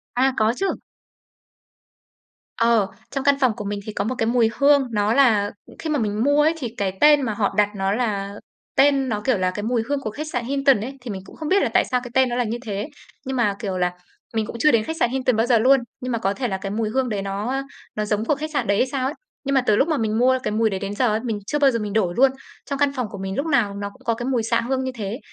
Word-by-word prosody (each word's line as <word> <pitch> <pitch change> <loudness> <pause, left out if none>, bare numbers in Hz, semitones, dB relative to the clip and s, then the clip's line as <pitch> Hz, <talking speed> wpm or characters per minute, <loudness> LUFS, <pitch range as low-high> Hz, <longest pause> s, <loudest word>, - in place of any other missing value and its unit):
À, 260 +2 +3
có 220 +1 +3
chứ. 390 - 0 1.9
Ờ, 230 -3 +3 0.2
trong 275 -1 -2
căn 280 0 +4
phòng 260 -3 +3
của 210 - -6
mình 205 0 -3
thì 215 - -6
có 200 - -1
một 245 +5 -2
cái 225 - 0
mùi 235 -1 +3
hương, 280 -1 +5
nó 210 0 +1
là 220 -7 +4 0.3
khi 320 - -4
mà 300 -2 +1
mình 215 -1 -1
mua 285 +2 +4
ấy 310 +2 +3
thì 270 -6 -3
cái 190 -1 -2
tên 295 -1 +7
mà 240 -5 -1
họ 205 -1 0
đặt 205 -1 +4
nó 195 0 0
là 200 -3 -1 0.4
tên 275 -1 +4
nó, 210 -2 -2
kiểu 260 -5 +3
là, 185 -1 0
cái 205 +2 -5
mùi 235 +1 +1
hương 285 -1 0
của 215 - -4
khách 305 +8 -6
sạn 245 -6 -3
Hilton 275 -3 +2
ấy. 265 +5 -6
Thì 245 -3 -6
mình 190 -1 -5
cũng - - -14
không 310 -1 -5
biết 395 +1 +4
là - - +1
tại - - +4
sao 250 - 0
cái 245 - -8
tên 260 -1 +3
nó 240 - -2
là 245 - +1
như 230 +1 -3
thế 205 +5 -4 0.4
nhưng 265 0 -3
mà, 210 -5 +2
kiểu 195 -5 -3
là, 180 -1 +1 0.4
mình 220 -1 0
cũng - - -8
chưa 305 +5 +5
đến 230 -2 +3
khách 320 +7 -5
sạn 240 - +3
Hilton 255 -1 0
bao 225 +1 +2
giờ 240 -2 +4
luôn, 265 +4 +5 0.2
nhưng 255 0 -3
mà 235 - 0
có 195 -3 0
thể 250 +3 -2
là 190 -4 -2
cái 195 +1 -5
mùi 215 +1 -1
hương 260 +2 0
đấy 205 -3 -2
nó, 195 +2 -3
ơ, 270 0 -1 0.3
nó 210 - -1
giống 210 +1 -1
của 295 - +2
khách 310 +2 -5
sạn - - 0
đấy 200 0 +2
hay 255 - +2
sao 260 -1 -2
ấy. 280 - -3 0.3
Nhưng 275 0 -1
mà 265 - +5
từ 215 -4 +2
lúc 270 - +3
mà 315 -3 +1
mình 220 -2 0
mua 255 +2 +4
cái 210 - -1
mùi 220 +1 +2
đấy 195 -2 -3
đến 200 +1 -4
giờ 250 +4 +2
ấy, 215 - +1
mình 225 -4 -2
chưa 295 - -1
bao 280 -2 +5
giờ 230 - -1
mình 210 -2 -4
đổi 195 -5 +1
luôn. 265 +1 +5 0.3
Trong 280 -1 -4
căn 285 -1 +3
phòng 250 -4 -2
của 200 - -8
mình 190 0 -4
lúc 280 - -1
nào 240 -10 +1
nó 200 0 -4
cũng 260 +6 -21
có 230 - +2
cái 240 +2 -5
mùi 250 -3 0
xạ 230 +1 +1
hương 260 +2 -1
như 260 - -2
thế, 215 +1 -4
235 Hz, 300 wpm, -22 LUFS, 210-270 Hz, 1.9 s, tên